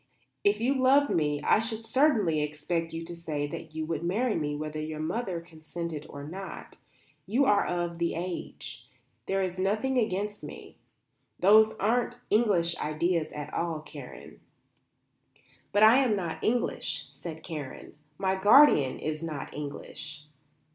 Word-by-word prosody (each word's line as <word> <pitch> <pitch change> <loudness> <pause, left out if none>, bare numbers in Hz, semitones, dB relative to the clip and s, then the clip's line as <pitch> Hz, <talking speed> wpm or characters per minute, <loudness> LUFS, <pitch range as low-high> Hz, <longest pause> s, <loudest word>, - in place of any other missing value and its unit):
"If 205 +1 +3
you 250 +4 +2
loved 275 +2 +4
me 150 -2 0
I - - +4
should 225 0 -4
certainly 225 - +3
expect 150 +3 -2
you 165 0 -5
to 175 +1 -7
say 155 -3 -3
that 155 +2 -8
you 160 0 -2
would 160 -1 -2
marry 215 +7 +1
me 150 -4 -1
whether 155 +1 -4
your 155 0 -5
mother 185 +2 -2
consented 165 -1 -7
or 140 - -8
not. 190 +6 -8 0.5
You 255 +7 +3
are 205 -4 +3
of 175 -1 -2
age. 170 +1 -4 0.4
There 195 0 +1
is 185 0 -3
nothing 215 +7 +1
against 205 -1 -2
me. - - -10 0.6
Those 215 +3 +6
aren't 240 +3 0
English 195 -7 +3
ideas 155 +1 0
at 150 0 -6
all, 165 -2 -1
Karen." 150 -4 -11 1.3
"But 205 +1 +4
I 220 +3 +8
am 255 -6 +3
not 175 -5 -4
English," 240 +2 -1
said 160 -2 -8
Karen, 150 -6 -7 0.2
"my 190 -1 +1
guardian 195 - +6
is 155 0 -3
not 155 -4 -5
English. 150 +1 -7
175 Hz, 145 wpm, -28 LUFS, 155-215 Hz, 1.3 s, I